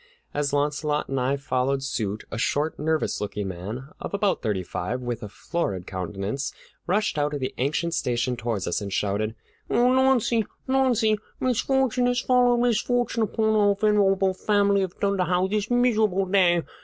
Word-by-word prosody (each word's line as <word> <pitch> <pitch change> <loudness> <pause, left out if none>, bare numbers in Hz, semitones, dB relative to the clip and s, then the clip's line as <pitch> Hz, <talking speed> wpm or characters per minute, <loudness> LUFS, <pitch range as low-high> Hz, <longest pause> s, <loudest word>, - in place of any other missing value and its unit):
As 145 -1 0
Launcelot 145 +1 0
and 135 -1 -1
I 130 +3 +1
followed 135 0 -1
suit, 105 -6 -3
a - - -4
short, 150 +6 0
nervous 155 +1 0
looking 105 -1 -3
man 105 +10 -6
of - - -4
about 200 -1 +1
thirty 105 -5 -1
five, 90 +7 -3
with 120 -2 -4
a 105 - -6
florid 100 - -3
countenance, 100 +8 -4 0.4
rushed 205 -3 +1
out 145 0 0
of - - -3
the 130 - -3
ancient 155 +6 0
station 125 -3 0
toward 115 -4 -3
us, 85 - -1
and 100 -1 -5
shouted: 105 +3 -1 0.3
"O - - -1
Launcie, 250 -2 +3 0.2
Launcie, 245 -5 +2 0.2
misfortune 255 0 +1
has 245 0 +1
followed 245 -1 +3
misfortune 240 0 +1
upon 220 0 +1
our 205 -1 +4
venerable 195 -2 +3
family 200 0 +2
of 185 -2 -4
Dunderhaugh 185 -2 +1
this 210 0 -1
miserable 220 -6 +2
day! 180 -3 +3
170 Hz, 160 wpm, -25 LUFS, -, 0.4 s, our